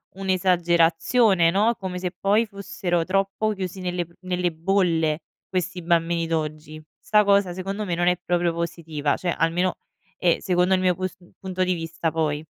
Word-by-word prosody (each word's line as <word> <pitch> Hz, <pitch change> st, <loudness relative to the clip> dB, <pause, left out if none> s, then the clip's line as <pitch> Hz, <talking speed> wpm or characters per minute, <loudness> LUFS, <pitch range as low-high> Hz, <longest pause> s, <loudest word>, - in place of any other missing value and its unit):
un'esagerazione, 175 Hz, +1 st, +3 dB
no, 215 Hz, +5 st, +2 dB
come 185 Hz, -3 st, -5 dB
se 180 Hz, -1 st, -2 dB
poi 210 Hz, +4 st, +2 dB
fossero 190 Hz, -4 st, -2 dB
troppo 195 Hz, +3 st, 0 dB
chiusi 190 Hz, -1 st, -5 dB
nelle 180 Hz, -2 st, -2 dB
pr 170 Hz, -, -24 dB
nelle 180 Hz, -1 st, -1 dB
bolle 165 Hz, -3 st, +1 dB, 0.3 s
questi 180 Hz, -1 st, -3 dB
bambini 170 Hz, 0 st, +1 dB
d'oggi. 155 Hz, -1 st, -4 dB, 0.2 s
'Sta 210 Hz, -1 st, +3 dB
cosa 200 Hz, -3 st, +3 dB
secondo 195 Hz, +3 st, -4 dB
me 180 Hz, -, -2 dB
non 175 Hz, +1 st, +1 dB
è 180 Hz, -1 st, +3 dB
proprio 175 Hz, -1 st, 0 dB
positiva; 165 Hz, -4 st, -2 dB
cioè, 180 Hz, -, -3 dB
almeno 175 Hz, +3 st, +1 dB, 0.4 s
è 175 Hz, -2 st, +2 dB
secondo 180 Hz, +1 st, +2 dB
il 185 Hz, -, +3 dB
mio 180 Hz, -1 st, +2 dB
pus 185 Hz, -1 st, -4 dB, 0.2 s
punto 185 Hz, -1 st, -2 dB
di 185 Hz, 0 st, +1 dB
vista, 165 Hz, 0 st, -3 dB
poi. 155 Hz, -2 st, -1 dB
180 Hz, 160 wpm, -24 LUFS, 165-190 Hz, 0.4 s, un'esagerazione